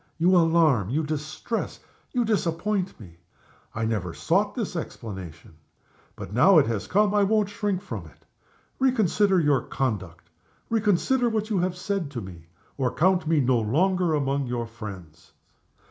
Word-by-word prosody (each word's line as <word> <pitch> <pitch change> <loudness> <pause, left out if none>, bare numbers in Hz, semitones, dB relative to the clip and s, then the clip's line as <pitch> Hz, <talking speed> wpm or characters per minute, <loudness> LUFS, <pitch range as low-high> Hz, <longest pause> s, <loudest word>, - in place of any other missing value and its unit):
You 175 +3 +4
alarm, 160 - +3
you 150 +6 0
distress, 155 +9 -4 0.3
you 245 -2 +1
disappoint 195 -2 -1
me. 85 -6 -13 0.6
I 115 0 -1
never 100 -7 -2
sought 200 +5 +1
this 220 -7 -3
explanation 95 - -7 0.6
but 95 - -8
now 175 - +6
it 150 - +6
has 110 -3 -3
come, 205 +1 +2
I 205 - +3
won't 210 0 +2
shrink 205 -3 -2
from - - -6
it. - - -21 0.5
Reconsider 210 -7 +3
your 145 -5 +3
conduct; 95 -12 -4 0.4
reconsider 225 +3 +2
what 220 -1 -2
you 200 - +2
have 180 0 -1
said 195 -4 -2
to 120 - -3
me 85 -4 -11 0.3
or 130 -2 +2
you - - -12
count 180 0 +2
me 160 -2 +3
no 125 -2 +2
longer 170 - +1
among 140 -1 -1
your 120 -1 -2
friends. 95 -8 -10
160 Hz, 155 wpm, -25 LUFS, -, 0.6 s, now